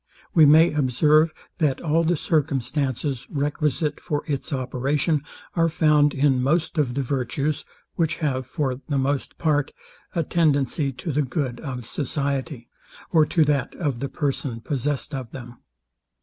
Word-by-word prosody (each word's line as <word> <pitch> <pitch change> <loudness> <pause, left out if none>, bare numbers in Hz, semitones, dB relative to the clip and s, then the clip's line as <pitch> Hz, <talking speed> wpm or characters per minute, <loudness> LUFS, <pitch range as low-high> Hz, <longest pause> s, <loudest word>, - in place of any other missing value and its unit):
We 160 -6 +7
may 160 +3 +6
observe, 150 +3 +3 0.3
that 150 -5 +1
all 165 +1 +1
the 170 +2 +2
circumstances 135 -3 -1
requisite 150 +1 -1
for 150 -4 -2
its 145 +1 -3
operation 140 +3 0 0.3
are 165 -1 +3
found 150 -3 +3
in 135 -2 +3
most 160 +4 +1
of 125 -5 +1
the 140 - 0
virtues; 135 +3 -1 0.3
which 165 -2 +1
have, 130 -5 -2
for 130 -2 -2
the 140 - +1
most 135 +1 -1
part, 145 -3 +1 0.4
a 165 - +1
tendency 145 -3 +1
to 130 +6 -5
the 150 +2 +1
good 130 -2 -2
of 125 -6 -6
society, 140 -1 -3 0.4
or 155 -3 +5
to 160 -1 +3
that 140 -4 0
of 145 -8 -2
the 140 +1 -3
person 135 -5 -2
possessed 145 +3 -2
of 130 -4 -4
them. 120 -1 -10
145 Hz, 150 wpm, -24 LUFS, 130-155 Hz, 0.4 s, We